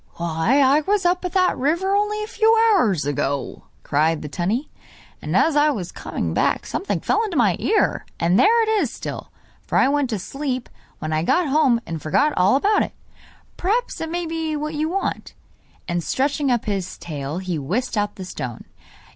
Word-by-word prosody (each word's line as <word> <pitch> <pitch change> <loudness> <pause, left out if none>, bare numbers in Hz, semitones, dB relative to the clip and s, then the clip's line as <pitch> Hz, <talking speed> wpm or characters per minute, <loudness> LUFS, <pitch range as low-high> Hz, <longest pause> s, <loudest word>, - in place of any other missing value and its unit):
'Why 170 - +1
I 280 +2 +5
was 395 +3 0
up 360 +1 +2
that 365 0 +1
river 340 +9 +1
only 420 +1 0
a - - -5
few 450 0 +3 0.2
hours 205 - +2
ago!' 145 -1 -2 0.2
cried 155 +2 +1
the - - -4
tunny; 195 - -2 0.5
'and - - 0
as 320 - +3
I 295 +1 +4
was 200 - -3
coming - - -4
back - - +1
something 395 - -2
fell 445 - +1
into 395 -8 -3
my 210 -8 +3
ear, 425 0 +1
and 175 +5 +3
there 455 - +5
it 440 - -1
is 275 - -1
still, - - -7 0.3
for - - -2
I - - +5
went 285 -2 +1
to 220 - -1
sleep, 255 +5 -4 0.3
when 155 0 -4
I 155 - +1
got 340 - +2
home 270 -5 +3
and 165 -2 -5
forgot 290 - +2
all 185 +6 +4
about 410 +9 +3
it. - - -3 0.6
Perhaps 455 +7 -1
it 325 - -3
may 345 +1 -2
be 320 -1 -2
what 305 +1 -3
you 310 +1 -1
want.' 390 +3 -3 0.5
And 175 -1 -1
stretching 280 - 0
up 240 -3 +1
his 195 -3 -3
tail 145 -1 -5
he 180 -4 -3
whisked 210 - -2
out 205 -1 -1
the 190 - -7
stone. 125 -9 -6
270 Hz, 190 wpm, -22 LUFS, -, 0.6 s, I